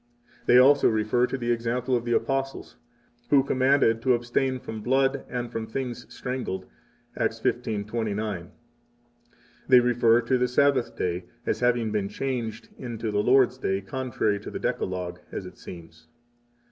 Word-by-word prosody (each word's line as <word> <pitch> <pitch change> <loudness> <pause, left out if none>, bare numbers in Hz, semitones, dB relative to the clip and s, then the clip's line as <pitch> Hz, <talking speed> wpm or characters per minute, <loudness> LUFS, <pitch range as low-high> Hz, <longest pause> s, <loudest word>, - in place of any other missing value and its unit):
32 - - +4
They - - +8
also 140 +3 +6
refer 110 +3 +1
to 135 - -3
the 120 -2 -1
example 120 +2 0
of 120 -1 -1
the 120 - 0
Apostles, 135 -1 -2 0.5
who 140 -2 +5
commanded 130 -4 +2
to 125 0 +3
abstain 120 +2 -1
from 110 -3 -7
blood 135 +3 +1
and 120 -1 -4
from 115 -2 -4
things 120 0 -5
strangled, 125 -8 -4 0.5
Acts - - -1
15:29. 105 0 -2
33 100 -5 -4 1.2
They 130 -2 +8
refer 120 -1 +4
to 125 +2 +1
the 125 - +2
Sabbath 135 0 +2
day 90 0 -2 0.2
as - - -1
having 120 -3 +1
been 105 -2 -1
changed 120 -1 -4
into 115 -3 -4
the 105 0 +1
Lord's 130 +2 +4
Day, 95 -6 0
contrary 110 -2 -1
to - - -8
the - - -5
Decalog, 90 -1 -3
as - - -5
it - - -12
seems. 80 -2 -12
120 Hz, 160 wpm, -26 LUFS, 110-130 Hz, 1.2 s, They